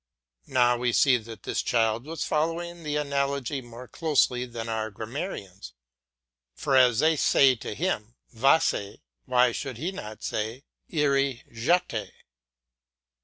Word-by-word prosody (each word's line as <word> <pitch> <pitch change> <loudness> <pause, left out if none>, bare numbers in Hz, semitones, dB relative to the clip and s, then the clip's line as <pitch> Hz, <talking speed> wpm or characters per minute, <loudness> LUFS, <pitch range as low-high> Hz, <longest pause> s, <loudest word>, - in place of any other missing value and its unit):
Now 125 -2 +3
we 120 0 0
see 130 0 +5
that 115 -1 -10
this - - -1
child 115 +1 +1
was 165 +2 -4
following 170 +2 -1
the 150 -2 -3
analogy 140 -1 -1
more 120 +1 -11
closely 130 -6 +1
than 115 -1 -6
our 110 -1 -2
grammarians, 105 - -6 0.8
for 135 - 0
as 125 -3 +5
they 160 +4 +4
say 135 -2 +5
to 105 - -6
him, 120 - -2 0.2
"Vas 135 +7 +4
y," 100 0 -6 0.3
why 125 -1 +4
should 130 0 -5
he 165 +9 -3
not 110 - -8
say, 110 +5 -3 0.3
"Irai 140 -5 +1
je 130 +11 +3
t - - -3
y?" - - -9
125 Hz, 145 wpm, -27 LUFS, 115-150 Hz, 0.8 s, see